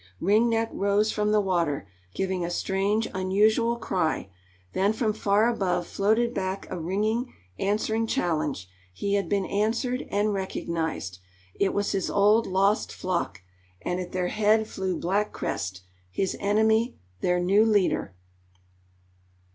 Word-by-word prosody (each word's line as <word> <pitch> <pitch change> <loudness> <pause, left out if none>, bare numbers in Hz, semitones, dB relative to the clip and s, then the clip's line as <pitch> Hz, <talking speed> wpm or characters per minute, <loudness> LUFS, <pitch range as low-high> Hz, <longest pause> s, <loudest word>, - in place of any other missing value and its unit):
Ring 215 +6 +3
Neck 225 0 +1
rose 200 +2 +2
from 210 0 0
the 215 - +4
water, 170 - 0 0.3
giving 190 -2 -1
a 170 - -2
strange, 195 +5 0
unusual 210 +5 +2
cry, 180 - -1 0.4
then 200 +3 +2
from 220 -1 0
far 210 +1 +2
above 190 -7 0
floated 220 +6 +1
back 190 -1 -3
a 185 - -3
ringing, 215 +8 -1 0.3
answering 220 +2 0
challenge; 155 - -1 0.2
he 200 - -2
had 200 -1 0
been 200 -2 +1
answered, 230 +6 -1
and 205 +1 +1
recognized. 165 - -3 0.3
It 200 - 0
was 205 0 0
his 195 -2 -1
old, 210 +3 +4
lost 195 +3 +2
flock, 170 - -3 0.4
and 180 +1 -1
at 180 -1 -5
their 180 -1 -1
head 215 +1 +2
flew 190 -3 -3
Black 200 +4 0
Crest, 95 -1 -4 0.3
his 185 - -1
enemy, 220 +3 +2 0.2
their 180 - +1
new 195 +4 +4
leader. 205 - +1
200 Hz, 140 wpm, -26 LUFS, 180-215 Hz, 0.4 s, the